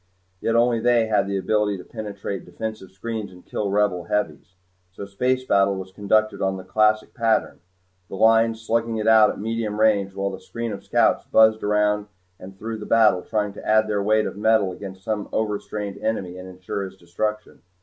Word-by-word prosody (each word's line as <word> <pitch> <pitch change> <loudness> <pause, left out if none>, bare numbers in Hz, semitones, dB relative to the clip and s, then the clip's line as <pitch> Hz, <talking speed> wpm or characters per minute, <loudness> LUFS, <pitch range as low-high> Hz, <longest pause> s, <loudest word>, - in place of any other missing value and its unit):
Yet 115 - 0
only 120 0 +3
they 120 0 +3
had 105 -2 +1
the 100 0 -1
ability 105 +1 0
to 90 - -10
penetrate 100 -3 -6
defensive 110 +1 -7
screens 105 +1 -5
and 90 -1 -16
kill 105 - -3
the - - -1
Rebel 100 -4 +1
heavies. 105 0 -3 0.4
So 100 +1 -8
space 125 +6 -1
battle 100 -3 +3
was 95 0 -7
conducted 110 +2 +1
on 95 0 0
the 95 - -8
classic 110 +2 +1
pattern 115 -2 0 0.5
the - - -6
Lines 115 +2 +4
slugging 115 0 0
it 110 0 -2
out 110 -1 +7
at - - -5
medium 110 0 -3
range 100 -3 +2
while 100 0 -2
the 95 - -7
screen 115 -1 -5
of 100 - -8
scouts - - +2
buzzed 110 0 +4
around 105 0 +1 0.3
and 95 +1 -11
through 110 +2 -5
the 105 - -8
battle 110 -5 +4
trying 105 0 -2
to - - -11
add 110 0 +3
their 105 -1 0
weight 110 +1 +2
of - - -4
metal 105 -2 +2
against 95 0 -9
some 105 -1 -3
overstrained 105 -1 -3
enemy 95 -5 -2
and 90 0 -9
ensure 90 +2 -5
his 95 0 -8
destruction. 105 +5 -4
105 Hz, 195 wpm, -23 LUFS, 95-110 Hz, 0.5 s, out